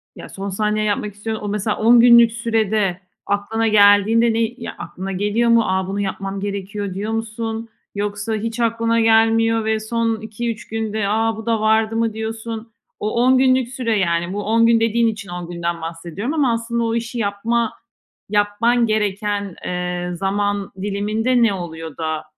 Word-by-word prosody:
ya - - -10
son 195 +1 -6
saniye 210 +2 0
yapmak 205 0 -1
istiyorsun. 215 +1 -5
O - - -3
mesela 210 +1 -1
10 235 +2 +6
günlük 235 -1 +7
sürede 220 -5 0 0.3
aklına 220 +3 0
geldiğinde 215 +2 +5
ne, 225 - 0
eee, 225 +2 -1
ya, - - -6
aklına 190 +1 -6
geliyor 210 +5 +1
mu? 230 0 +5
Aaa, 190 -1 -1
bunu 200 +1 -3
yapmam 195 0 -3
gerekiyor 200 0 -4
diyor 205 +3 -3
musun 225 0 -4 0.3
yoksa 205 +2 -2
hiç 225 +2 -4
aklına 230 0 +1
gelmiyor 225 0 +3
ve 220 0 +1
son 225 0 -1
2-3 225 +1 -5
günde, 220 -2 -2
aaa, 225 +1 +1
bu 220 - -8
da 225 -2 0
vardı 220 +1 +2
mı 225 -1 0
diyorsun? 225 +1 -5 0.3
O 210 - -2
10 260 0 +5
günlük 255 -1 +3
süre 240 -5 -1
yani 175 0 0
bu 205 0 -3
10 230 +2 +3
gün 230 -1 +4
dediğin 230 +1 +2
için 215 -4 -4
10 175 -1 -6
günden 170 -1 -3
bahsediyorum 170 - -5
ama 275 -7 +2
aslında 235 +1 -2
o 230 0 0
işi 235 +1 -3
yapma 225 +3 0 0.6
yapman 215 +4 +2
gereken, 205 -2 -1
eee, 180 0 -3
zaman 200 +1 -1
diliminde 215 +5 +1
ne 215 -3 +3
oluyor 165 -4 -7
da 160 -1 -3
215 Hz, 170 wpm, -20 LUFS, 200-230 Hz, 0.6 s, günlük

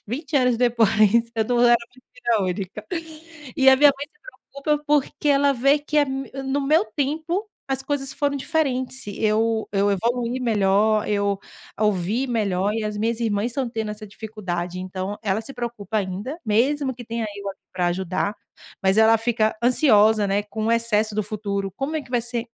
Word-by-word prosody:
20 280 +6 -5
anos 250 -3 +3
depois 235 -2 +3 0.5
eu 220 - +2
não 240 +1 +1
era 240 0 +7 0.2
filha 245 -3 -2
única, 190 +3 -4 0.7
e 265 -1 +5
a 265 - +8
minha 290 +1 +7
mãe 285 - -5
se 445 - -34 0.4
preocupa, 300 0 0
porque 295 0 +1
ela 280 0 +4
vê 275 +3 +3
que 300 +1 -4
é 295 - +5
me 270 0 -5
no 270 +2 0
meu 310 +7 +3
tempo 320 +7 -2 0.2
as 270 -1 -2
coisas 270 -1 -2
foram 285 -1 -1
diferentes, 265 -3 -1
eu 220 +2 0
eu 200 0 +2
evoluí 235 +5 -1
melhor, 215 -2 +2
eu 200 -1 0 0.4
ouvi 210 +4 +1
melhor 205 -5 0
e 225 - -2
as 210 0 -3
minhas 230 +2 -1
irmãs 210 -1 0
estão 250 +1 -2
tendo 220 -2 -3
essa 215 0 -8
dificuldade. 185 -5 -5
Então 185 +2 -5
ela 200 0 0
se 230 +5 -8
preocupa 225 -4 -4
ainda, 205 - -3
mesmo 260 +5 +1
que 245 0 -10
tenha 230 0 -3
eu 200 0 -6
aqui 195 - -8
para 180 -2 0
ajudar, 185 +3 -1 0.5
mas 190 +2 +3
ela 220 +1 +6
fica 225 -1 0
ansiosa, 220 -4 +4
né, 200 +1 +1
com 215 +1 -4
o 230 - +2
excesso 220 -2 +1
do 215 - 0
futuro 200 -2 -3
"como 285 +4 -3
é 305 - -3
que 245 - -18
vai 245 -2 +1
ser 235 0 -2
225 Hz, 185 wpm, -23 LUFS, 205-265 Hz, 0.7 s, a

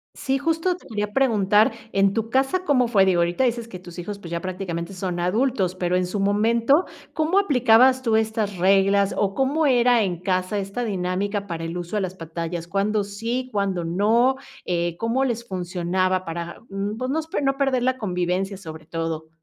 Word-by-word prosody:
Sí, 270 0 -1
justo 325 +4 0
te 360 - -16
quería 210 -2 -3
preguntar, 215 -5 +3 0.2
¿en 195 0 +3
tu 225 0 -2
casa 270 +8 +1
cómo 255 -5 +3
fue? 200 -5 +4
Digo, 175 -2 +3
ahorita 175 +9 +1
dices 235 -2 0
que 185 - -8
tus 175 -1 -11
hijos, 200 +3 -5
pues, 170 -3 -10
ya 170 0 -2
prácticamente 185 -1 -4
son 180 -1 -3
adultos, 190 0 0
pero 180 -1 0
en 180 -1 +1
su 200 +2 -3
momento, 230 - +3 0.3
¿cómo 320 +5 +1
aplicabas 260 - +5
tú 225 -3 +1
estas 220 -3 0
reglas, 195 +2 +3
o, 200 -1 0
cómo 285 +3 +2
era 245 -2 +4
en 175 -3 -2
casa 185 +2 -1
esta 200 +5 -3
dinámica 200 0 -2
para 170 -3 -5
el 165 +2 -4
uso 175 +4 -5
de 205 - +1
las 185 0 -4
pantallas? 165 0 -5
¿Cuándo 205 +2 0
sí, 230 +6 -4
cuándo 195 -4 -1
no? 220 +9 +3 0.3
Eh, 175 -1 -1
¿cómo 230 +6 0
les 235 -2 -2
funcionaba 185 0 -1
para, 170 +1 -5
mm, 200 +2 -3
pues, 255 +2 -2
nos 320 +1 -2
per 290 - -2
no 270 0 +2
perder 270 -3 +1
la 260 0 +1
convivencia 185 0 -1
sobre 160 -4 -10
todo? 165 -1 -4
200 Hz, 190 wpm, -23 LUFS, 180-240 Hz, 0.3 s, aplicabas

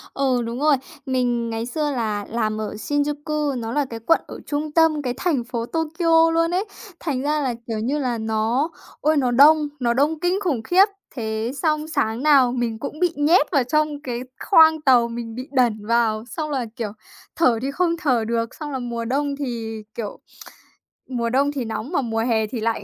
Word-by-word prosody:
Ừ, 260 -3 +1
đúng 235 +3 -4
rồi. 300 0 +4 0.3
Mình 245 -3 0
ngày 225 0 -3
xưa 295 +3 -1
là 215 -5 -2
làm 215 -2 -1
ở 215 - -4
Shinjuku, 290 +2 -1
nó 225 0 -4
là 290 +1 +1
cái 230 -3 -7
quận 290 +9 +2
ở - - -8
trung 295 +1 -3
tâm, 320 -2 +3
cái 250 -3 -2
thành 310 -9 0
phố 235 -1 -4
Tokyo 325 +2 +2
luôn 330 +1 +2
ấy, 370 +4 0 0.3
thành 275 -6 -2
ra 300 +1 0
là, 255 -3 0
kiểu 225 -2 -2
như 270 +7 -1
là, 245 -4 -1
nó 220 +6 0 0.3
ôi, 310 0 +3
nó 250 -3 +2
đông, 300 +4 +6
nó 240 -2 +1
đông 295 +5 +1
kinh 360 +3 +1
khủng 275 -11 0
khiếp. 365 - +5 0.3
Thế 220 0 -2
xong 305 -1 0
sáng 230 -4 -1
nào 275 -5 +5
mình 235 -3 -2
cũng 295 +3 -6
bị 355 -2 +2
nhét 300 +3 +3
vào 280 -5 +3
trong 300 +2 0
cái 240 -2 -3 0.3
khoang 320 -4 +6
tàu, 245 -4 +5
mình 230 -1 -6
bị 255 - -5
đẩn 235 -6 +1
vào 225 -2 +2
xong 305 +4 -4
là, 265 -5 -1
kiểu, 225 -5 -4 0.4
thở 250 -9 +3
thì 270 +2 -2
không 335 +2 0
thở 255 -8 +1
được, 230 0 -2
xong 300 -2 -6
là 265 - -3
mùa 235 -1 -4
đông 280 +3 -1
thì, 230 -6 -5
kiểu, 215 -3 -5 0.9
mùa 235 -2 -1
đông 280 +3 +2
thì 265 -5 -3
nóng 220 +5 -5
mà 315 - +1
mùa 225 -2 -2
hè 220 -2 +1
thì 230 +1 -5
lạnh. 225 +1 -1
260 Hz, 205 wpm, -22 LUFS, 230-300 Hz, 0.9 s, đông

